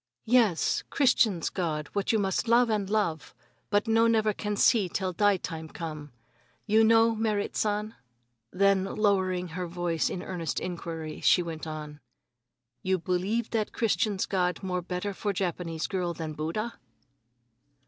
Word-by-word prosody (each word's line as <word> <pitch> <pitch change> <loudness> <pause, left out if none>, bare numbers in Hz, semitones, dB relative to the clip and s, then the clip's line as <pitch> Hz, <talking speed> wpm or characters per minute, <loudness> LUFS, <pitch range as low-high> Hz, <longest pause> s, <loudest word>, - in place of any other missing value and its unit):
"Yes, 225 -7 +3
Christians' 230 - +2
God, 155 -5 -2
what 200 -1 0
you 225 - +2
must 195 +2 0
love 235 0 +4
and 205 -3 -1
love, 200 -8 -1 0.3
but 205 +2 +1
no 225 +1 +4
never 220 -2 +2
can 210 0 -3
see 205 -3 +3
till 185 +1 -2
die 205 +1 +3
time 160 -3 -6
come. 155 -4 -7 0.5
You 220 +2 +4
know, 225 +1 +5
Merrit 215 -2 -1
San?" 210 +1 -1 0.6
Then, 195 0 +3
lowering 190 -3 0
her 180 +2 -4
voice 170 -1 -1
in 180 - -5
earnest 170 -6 -3
inquiry, 165 -3 -5
she 180 - +4
went 165 -1 -6
on: 150 -1 -7 0.8
"You 190 0 +1
believe 185 +6 -1
that 220 -2 -1
Christians' 215 -3 0
God 180 -1 -1
more 180 -1 -1
better 180 +3 -4
for 205 +1 -2
Japanese 170 -3 -2
girl 180 -3 -2
than 155 -1 -5
Buddha?" 165 +10 -4
190 Hz, 150 wpm, -28 LUFS, 170-215 Hz, 0.8 s, know